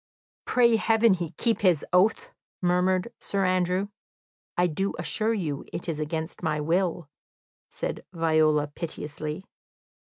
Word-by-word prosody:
"Pray 235 -2 +4
heaven 225 -1 +4
he 175 -3 -3
keep 230 -2 +1
his 180 -7 +3
oath!" 220 - +3 0.3
murmured 180 +4 +1
Sir 195 -1 -1
Andrew. 185 +2 +1 0.7
"I 175 - +4
do 190 +4 -1
assure 225 +1 +1
you 155 -9 -3
it 175 - -5
is 160 -3 -2
against 160 +2 -4
my 155 -3 0
will," 170 +1 0 0.6
said - - -4
Viola 155 -3 +3
piteously. 150 +1 -6
180 Hz, 125 wpm, -26 LUFS, 155-195 Hz, 0.7 s, Pray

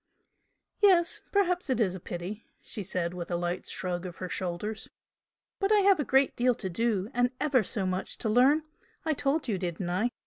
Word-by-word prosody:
"Yes 360 -5 +4
perhaps 360 -5 +1
it 255 - +1
is 195 -5 +2
a 185 - -6
pity!" 180 +6 -6 0.2
she 210 - -5
said, 180 -2 -2
with 175 -1 -6
a 175 - 0
light 175 +1 -2
shrug 180 -1 -3
of 175 - -8
her 185 - -6
shoulders 185 +5 -4 0.7
"But 390 +1 +1
I 420 -1 +6
have 390 -3 +5
a - - +2
great 270 0 +3
deal 245 0 +3
to 190 - -4
do, 220 +1 0
and 245 0 +3
ever 280 -5 +3
so 200 0 -2
much 185 0 -3
to - - -3
learn. 260 +8 +4 0.4
I 315 - +2
told 285 +1 0
you, 205 -5 -1
didn't 175 0 -3
I? 210 +7 +1
215 Hz, 200 wpm, -29 LUFS, 180-280 Hz, 0.7 s, I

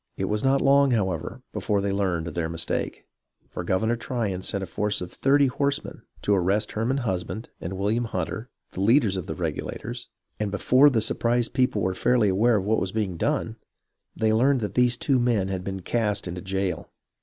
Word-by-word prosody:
It 95 - -1
was 105 +2 -1
not 135 +1 +3
long, 140 0 +5
however, 100 0 -1
before 105 -2 0
they 100 0 -1
learned 95 -4 0
of 85 - -5
their 80 -1 -2
mistake; 85 0 -3 0.4
for 90 - -6
Governor 100 +6 +1
Tryon 115 -6 -3
sent 100 +1 -2
a - - -2
force 105 +3 -1
of 90 -1 -6
thirty 140 +1 +3
horsemen 140 +2 -2 0.2
to 105 - +2
arrest 100 +3 +1
Herman 125 +4 -1
Husband 105 +3 -3
and 85 - -4
William 110 +5 0
Hunter, 110 +4 -4 0.2
the 95 - -5
leaders 110 -1 +4
of 95 - -4
the - - -4
Regulators, - - -5 0.3
and 105 -1 -1
before 130 +8 +5
the 115 -5 +1
surprised 120 +2 0
people 125 -6 +1
were 95 +1 +1
fairly 115 +2 +2
aware 110 +5 +3
of 100 -2 0
what 110 +2 +2
was 95 - -2
being 105 -4 -2
done, - - -1 0.6
they 110 -1 +2
learned 130 +3 +3
that 105 -3 -3
these 125 +1 +3
two 135 -1 +2
men 115 -6 +1
had 95 -1 -3
been 95 0 -4
cast 105 -1 -1
into 90 +1 -5
jail. 95 -2 -2
105 Hz, 195 wpm, -25 LUFS, 95-120 Hz, 0.6 s, long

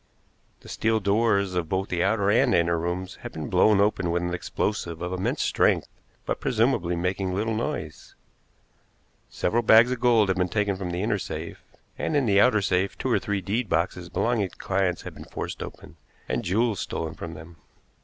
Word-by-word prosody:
The - - -15
steel 110 0 0
doors 100 -1 +2
of 90 -3 -2
both 95 +1 -1
the 90 -1 0
outer 100 -1 +2
and 115 - +4
inner 85 0 +2
rooms 90 +2 -4
had - - -8
been 80 -2 -6
blown 105 -2 +4
open 100 -3 +1
with 85 +1 0
an 90 0 -2
explosive 85 -1 -3
of 90 +1 -4
immense 95 +1 -1
strength - - +2 0.4
but - - -2
presumably 115 -8 +1
making 90 +2 -1
little 110 +3 -1
noise. 110 +2 -4 1.1
Several 115 +6 0
bags 115 +2 +6
of 125 - -2
gold 115 -4 +4
had 95 - +1
been 90 0 +1
taken 100 +1 0
from 95 -1 -5
the 90 +2 -2
inner 105 -2 0
safe, - - -6 0.4
and 155 - -1
in 140 -3 +3
the 100 -2 +4
outer 110 -2 +4
safe 95 +1 0
two - - -2
or - - +3
three 100 -1 -2
deed 105 +4 -2
boxes 85 +1 -1
belonging 110 -1 0
to - - -19
clients 95 -2 -1
had - - -8
been - - -11
forced - - -6
open, - - -9 0.3
and 120 - -2
jewels 105 +2 +1
stolen 80 -1 -4
from 85 -1 -7
them. 80 +2 -12
95 Hz, 195 wpm, -25 LUFS, 90-110 Hz, 1.1 s, bags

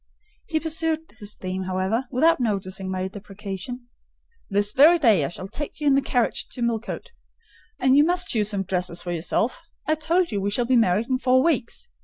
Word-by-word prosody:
He 320 -2 0
pursued 320 0 -2
his 205 0 -6
theme, 185 0 -4
however, 190 +7 -1
without 315 +6 +3
noticing 195 -4 -2
my 185 0 -2
deprecation. 205 +4 -7 0.6
"This 205 0 +1
very 305 +9 +6
day 225 - +4
I - - 0
shall 185 +4 -7
take 290 +9 -6
you 300 - -4
in 285 - +5
the 275 - +4
carriage 245 -3 0
to 245 - -3
Millcote, 235 - -3 0.7
and 260 +1 +3
you 290 - +7
must 355 +3 +1
choose 210 -3 +1
some 200 -2 0
dresses 180 -2 0
for 175 - -4
yourself. 175 +8 -1 0.3
I 310 - +3
told 330 +2 +1
you 205 -2 -1
we 200 - 0
shall 240 +4 0
be 255 +1 +2
married 220 -1 +3
in 255 -1 0
four 260 0 +3
weeks. 305 - -1
230 Hz, 195 wpm, -24 LUFS, 195-285 Hz, 0.7 s, you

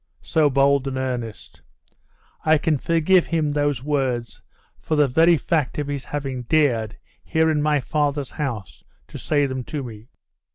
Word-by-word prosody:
So 155 -2 +2
bold 140 0 +3
and 130 -1 -3
earnest! 120 -6 -5 0.8
I 155 0 +4
can 155 -2 0
forgive 170 +4 +3
him 160 -3 0
those 145 -3 0
words 130 -5 -2 0.4
for 155 - -2
the 150 -1 +4
very 165 +6 +4
fact 150 -1 -1
of 150 - -1
his 140 -3 -4
having 135 -3 -4
dared, 120 -5 +1 0.3
here 160 0 +2
in 150 -1 +1
my 150 -1 +2
fathers 145 -1 -1
house, 110 - -5 0.3
to - - -8
say 145 -2 +1
them 130 -2 -3
to 145 -3 -4
me.... 110 -2 -10
145 Hz, 160 wpm, -22 LUFS, 130-155 Hz, 0.8 s, I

